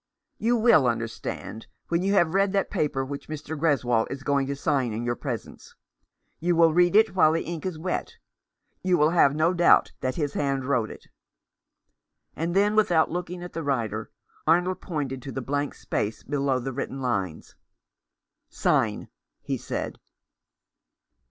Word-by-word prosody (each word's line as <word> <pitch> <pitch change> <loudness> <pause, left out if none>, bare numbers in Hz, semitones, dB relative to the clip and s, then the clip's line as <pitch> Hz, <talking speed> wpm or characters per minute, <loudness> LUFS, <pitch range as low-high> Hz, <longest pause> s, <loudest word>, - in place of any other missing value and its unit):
"You 235 +2 +2
will 220 - +5
understand 115 -1 -4 0.2
when 170 +1 +1
you 195 +2 +1
have 170 -4 +3
read 195 0 +2
that 195 - 0
paper 140 -3 0
which 140 +1 -7
Mr. 155 0 -5
Greswold 130 -7 +1
is 135 -1 -6
going 140 -1 +1
to 140 - -2
sign 135 -4 0
in 115 +2 -3
your 120 0 0
presence. 125 -5 -7 0.6
You 175 +1 +1
will 165 -1 +5
read 175 +2 +4
it 220 -2 +5
while 160 -4 +5
the 165 - 0
ink 170 +1 -4
is 180 -4 -4
wet. 180 +4 -3 0.7
You 185 -2 +2
will 150 +2 +4
have 145 -5 +4
no 160 +3 +2
doubt 175 -1 +5
that 130 0 -1
his 145 -3 -2
hand 140 -2 -1
wrote 125 -5 +1
it." - - -11 1.3
And 170 +3 -2
then, 205 +2 +3
without 175 -7 +3
looking 175 +1 -4
at 175 - -8
the 165 - -3
writer, 130 -7 -2 0.4
Arnold 180 +3 +2
pointed 140 -6 -4
to 135 - -7
the 135 - -4
blank 145 +3 -2
space 105 +2 -3
below 140 -1 0
the 130 +1 -4
written 135 +1 -4
lines. 100 -10 -3 1.0
"Sign," - - 0 0.4
he - - -2
said. - - -5
150 Hz, 165 wpm, -26 LUFS, 135-175 Hz, 1.3 s, will